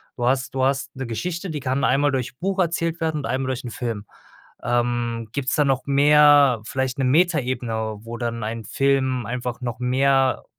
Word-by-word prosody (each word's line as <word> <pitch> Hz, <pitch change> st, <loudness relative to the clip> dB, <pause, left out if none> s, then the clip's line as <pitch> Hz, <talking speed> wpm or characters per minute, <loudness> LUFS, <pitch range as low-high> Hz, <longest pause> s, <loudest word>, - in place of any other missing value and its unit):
du 120 Hz, -, -2 dB
hast 130 Hz, +1 st, 0 dB
du 130 Hz, -, +1 dB
hast 135 Hz, +1 st, -1 dB
'ne 130 Hz, -, -5 dB
Geschichte, 170 Hz, -, -4 dB
die 150 Hz, -2 st, -4 dB
kann 130 Hz, +1 st, -1 dB
einmal 145 Hz, +1 st, +3 dB
durch 125 Hz, -2 st, -3 dB
Buch 195 Hz, +2 st, -2 dB
erzählt 165 Hz, -1 st, 0 dB
werden 160 Hz, -1 st, 0 dB
und 145 Hz, -, -4 dB
einmal 130 Hz, +3 st, -1 dB
durch 130 Hz, -1 st, -3 dB
'n -, -, -4 dB
Film. 115 Hz, -3 st, -4 dB, 0.6 s
Ähm, 120 Hz, -1 st, -1 dB
gibt's 140 Hz, -2 st, -1 dB
da 150 Hz, -, +3 dB
noch 135 Hz, -1 st, 0 dB
mehr, 145 Hz, -3 st, +5 dB
vielleicht 130 Hz, 0 st, -2 dB
'ne 135 Hz, -, +1 dB
Metaebene, 125 Hz, -8 st, 0 dB
wo 115 Hz, +1 st, -7 dB
dann 115 Hz, -1 st, -3 dB
ein 110 Hz, +1 st, -4 dB
Film 130 Hz, -3 st, +1 dB
einfach 125 Hz, +1 st, -4 dB
noch 120 Hz, -1 st, -4 dB
mehr 135 Hz, +1 st, +2 dB
130 Hz, 185 wpm, -22 LUFS, 120-140 Hz, 0.6 s, mehr